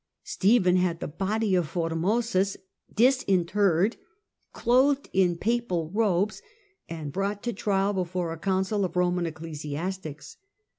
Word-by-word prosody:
Stephen 190 -3 +3
had 180 -2 0
the - - -4
body 200 +6 -1
of 175 -4 +2
Formosus 185 +4 0 0.3
disinterred, 200 -5 +2 0.5
clothed 265 +4 +2
in 180 -3 +2
papal 185 -7 -1
robes 205 -2 +1 0.5
and 160 -3 -5
brought 200 +1 -2
to 240 - -2
trial 195 0 0
before 180 -2 -2
a 165 - -9
council 190 +2 0
of 185 - -3
Roman 180 -1 +1
ecclesiastics. 155 +1 -6
185 Hz, 115 wpm, -26 LUFS, 170-210 Hz, 0.5 s, Stephen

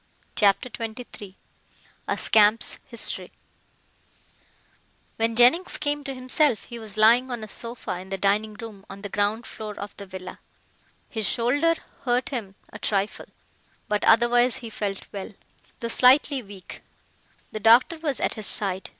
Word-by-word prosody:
CHAPTER 200 +3 +3
XXIII 220 -4 -8 0.7
A - - -1
SCAMP'S 215 +1 +4
HISTORY - - 0 1.9
When 225 0 0
Jennings 250 +10 +4
came 290 -1 -1
to 270 -2 -4
himself 255 -1 +2
he 235 -1 -9
was 215 -1 -7
lying 235 +4 +5
on 240 -3 -4
a - - -6
sofa 230 -5 -5
in 190 +1 -11
the 195 - -3
dining 210 +2 +1
room 215 -3 -10
on 195 +1 -10
the 205 - -5
ground 205 +4 -1
floor 215 -2 -8
of 200 0 -7
the 200 - -8
villa. 185 -1 -9 0.7
His 220 -3 -2
shoulder 290 +8 +2 0.3
hurt 245 0 0
him 215 -8 -5 0.2
a - - -8
trifle, 200 0 -1 0.6
but 210 0 -1
otherwise 240 +2 +4
he 230 -3 -7
felt 200 -3 -4
well, 200 +2 -6 0.5
though 230 - -2
slightly 260 +3 +5
weak. 200 -4 -11 0.7
The 215 - -5
doctor 235 +9 +5
was 295 -5 -2
at - - 0
his 215 -3 -4
side. 190 -2 -3
225 Hz, 150 wpm, -25 LUFS, 205-245 Hz, 1.9 s, lying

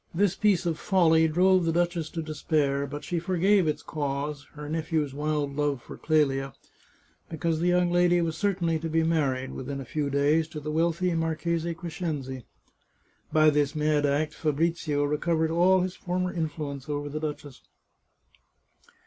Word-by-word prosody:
This 200 0 +2
piece 200 -4 +2
of 165 -2 -1
folly 165 -4 +4
drove 185 +3 +3
the 165 - +1
duchess 170 -1 0
to 165 - -4
despair, 145 -3 0
but 145 +2 -7
she 175 - -2
forgave 185 +2 +2
its 150 - -2
cause 145 -1 -3
— - - -30
her 150 0 -7
nephew's 155 -2 -1
wild 145 -1 -2
love 145 -2 0
for - - -11
Clelia 135 -4 +1 0.4
— - - -36
because 165 0 -1
that 175 - +1
young 180 0 +3
lady 175 0 +4
was 165 -2 -1
certainly 175 -4 0
to 165 +1 -4
be 160 +1 +2
married, 140 -5 0
within 135 +1 -5
a 135 - -6
few 150 +1 -2
days, 145 +3 +2
to 155 -1 -7
the 150 +1 -5
wealthy 170 +3 +1
Marchese 165 +1 -1
Crescenzi. 155 -7 -5 0.9
By 155 0 +5
this 145 0 +1
mad 150 -1 +2
act 150 +2 0
Fabrizio 155 -1 0
recovered 160 +2 0
all 180 +3 +4
his 185 0 -3
former 180 0 -2
influence 150 -5 -4
over 145 0 -2
the 150 +1 -4
duchess. 150 -3 -6
155 Hz, 165 wpm, -27 LUFS, 145-170 Hz, 0.9 s, By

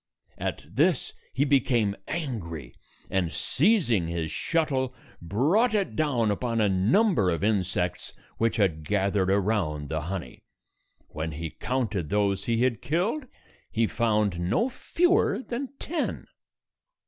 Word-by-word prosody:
At - - -3
this, - - +1 0.2
he 140 - +1
became 120 -7 +2
angry, 85 - -4 0.4
and, 90 -4 +1
seizing 140 - +2
his 85 -2 -3
shuttle, 135 -6 0 0.3
brought 155 - +2
it 200 -2 0
down 125 -9 +1
upon 115 +2 -1
a 105 - +4
number 105 - +3
of 85 +2 -1
insects 90 -4 0 0.3
which 115 0 +2
had 85 -7 +1
gathered 100 +1 +1
around 95 -8 0
the 80 -1 -1
honey. 90 +3 -6 0.7
When 80 +1 -4
he 80 +1 -5
counted 110 - -2
those 100 -2 +1
he 115 0 +1
had 125 -4 +1
killed, 195 - -1 0.4
he 115 -1 +1
found 105 -5 +1
no 95 - +1
fewer 355 - +1
than 255 +2 -4
ten. 325 -1 -3
110 Hz, 125 wpm, -27 LUFS, 90-140 Hz, 0.7 s, a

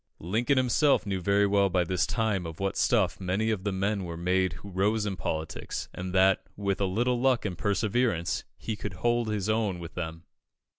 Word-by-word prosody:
Lincoln 115 - 0
himself 130 +1 +3
knew 95 -2 -2
very 100 +3 +3
well 100 -1 +3
by 90 -1 +2
this 90 +1 0
time 110 -7 0
of 80 -1 -8
what 100 +1 -1
stuff 100 -2 +2
many 95 +4 0
of 100 -4 -2
the 100 - -1
men 100 +1 -1
were 85 -2 -5
made 90 0 +1
who 95 +5 -10
rose 105 +4 +1
in 100 -2 -2
politics, 80 -3 -4
and 90 0 -5
that, 95 +1 +4 0.2
with 100 -1 -1
a - - +3
little 120 +6 0
luck 130 -3 +2
and 95 -4 -2
perseverance, 105 -2 0
he 110 - -4
could 105 -1 -5
hold 120 +4 +1
his 105 -2 -1
own 110 -4 +1
with 85 -1 -8
them. 80 -1 -5
100 Hz, 200 wpm, -28 LUFS, 90-110 Hz, 0.2 s, that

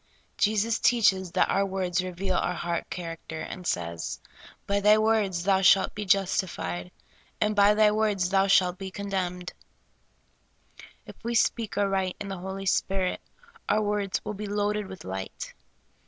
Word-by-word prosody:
Jesus 220 +2 +1
teaches 190 -6 +3
that 185 - +3
our 195 - +2
words 185 -2 -1
reveal 185 +1 -3
our 180 0 0
heart 170 0 -3
character, 165 -2 -6
and 180 +1 -6
says: 85 -1 -3 0.5
"By 200 0 +1
thy 210 +1 +5
words 215 -5 +1
thou 190 0 +3
shalt 195 0 +5
be 210 0 -5
justified, 185 - 0 0.5
and 210 0 +1
by 205 +1 +5
thy 210 0 +5
words 210 -4 +1
thou 195 0 +3
shalt 185 -2 +3
be 195 -1 -5
condemned." 185 -2 -4 1.5
If - - -14
we 235 +1 -2
speak 225 -2 +1
or 205 0 +2
write 190 -2 -1
in 200 - -5
the 195 -2 -5
Holy 190 +1 -6
Spirit, 190 -1 0 0.5
our 215 +1 +3
words 205 -2 -1
will - - -3
be 210 +1 -6
loaded 205 0 -1
with 190 -1 -10
light. 95 0 -6
195 Hz, 155 wpm, -27 LUFS, 180-210 Hz, 1.5 s, thy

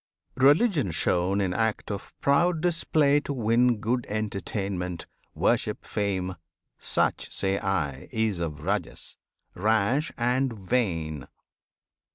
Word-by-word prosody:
Religion 145 - +4
shown 90 +4 +1
in 95 -2 0
act 110 0 -1
of 100 -1 -6
proud 165 +4 +3
display 155 -4 +2
To 145 - -4
win 120 0 +3
good 120 +4 -1
entertainment, 100 -4 -3 0.3
worship, - - 0
fame, 95 -3 -2 0.4
Such - - 0
say 95 0 0
I 75 -9 -2
is 110 -5 0
of 75 -3 -4
Rajas, - - -3 0.4
rash 110 +8 +1
and 125 +2 +1
vain. 90 - -1
105 Hz, 110 wpm, -27 LUFS, 95-130 Hz, 0.4 s, Religion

